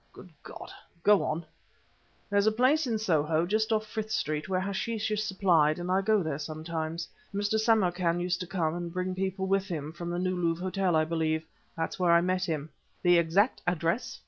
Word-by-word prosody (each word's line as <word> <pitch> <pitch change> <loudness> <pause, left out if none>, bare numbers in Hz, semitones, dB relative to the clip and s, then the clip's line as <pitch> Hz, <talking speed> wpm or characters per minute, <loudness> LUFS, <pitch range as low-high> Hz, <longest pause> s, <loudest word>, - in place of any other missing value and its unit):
"Good 180 - -13
God! - - -10 0.3
Go 205 -1 +5
on." 160 +2 -2 0.9
"There's 200 +1 +3
a - - +5
place 260 +6 +2
in 225 -2 0
Soho, 160 -5 +1
just 220 +4 0
off 215 0 +1
Frith 215 0 -5
Street, 155 -4 -2
where 185 -1 +1
hashish 210 +3 -2
is 210 0 0
supplied, 180 -7 +3
and 175 +1 -3
I 190 +1 +3
go 210 -1 +2
there 155 -3 -3
sometimes. 160 +2 -4 0.2
Mr. 205 +2 0
Samarkan 180 -6 +2
used 180 +1 -1
to 180 - -5
come, 165 -4 -1
and 175 0 -4
bring 185 +1 -2
people 190 0 -2
with 195 0 +1
him 155 -5 -4
from 170 +1 -6
the 175 - -2
New 185 +1 0
Louvre 170 0 -1
Hotel, 185 -2 0
I 155 - +4
believe. 160 -1 -1 0.3
That's 165 +3 -3
where 175 -2 +4
I 170 - +6
met 185 +1 0
him." 155 -3 -3 0.3
"The 175 -1 +6
exact 185 +8 +2
address?" 175 +5 -1
180 Hz, 200 wpm, -29 LUFS, 165-200 Hz, 0.9 s, I